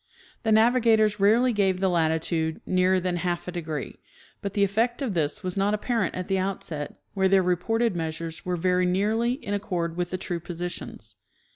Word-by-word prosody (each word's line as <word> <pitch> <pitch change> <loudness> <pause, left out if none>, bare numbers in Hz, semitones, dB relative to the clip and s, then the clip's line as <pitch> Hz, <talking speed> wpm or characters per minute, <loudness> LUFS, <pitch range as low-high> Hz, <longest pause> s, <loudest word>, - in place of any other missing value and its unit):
The 225 - 0
navigators 220 -2 +4
rarely 230 +5 +4
gave 190 -3 +1
the 190 - +2
latitude 160 -1 0
nearer 185 0 +3
than 180 -1 -1
half 175 0 -2
a - - -3
de 175 -1 -4
gree, 155 -4 -5 0.4
but 200 0 -4
the 200 - +3
effect 225 +5 +1
orthis 170 - -1
was 185 -1 -1
not 200 +1 +2
apparent 220 -3 -1
at 180 -1 -4
the 195 -1 +1
outset, 175 -6 -4 0.2
where 190 -1 +2
their 190 0 +4
reported 210 +5 +1
measures 165 0 -4
were 180 0 -1
very 180 +1 +2
nearly 215 +6 +1
in 250 -7 -5
accord 175 -5 -2
with 175 -1 -1
the 185 - -3
true 175 -2 -4
positions. 170 - -7
185 Hz, 180 wpm, -26 LUFS, 175-210 Hz, 0.4 s, navigators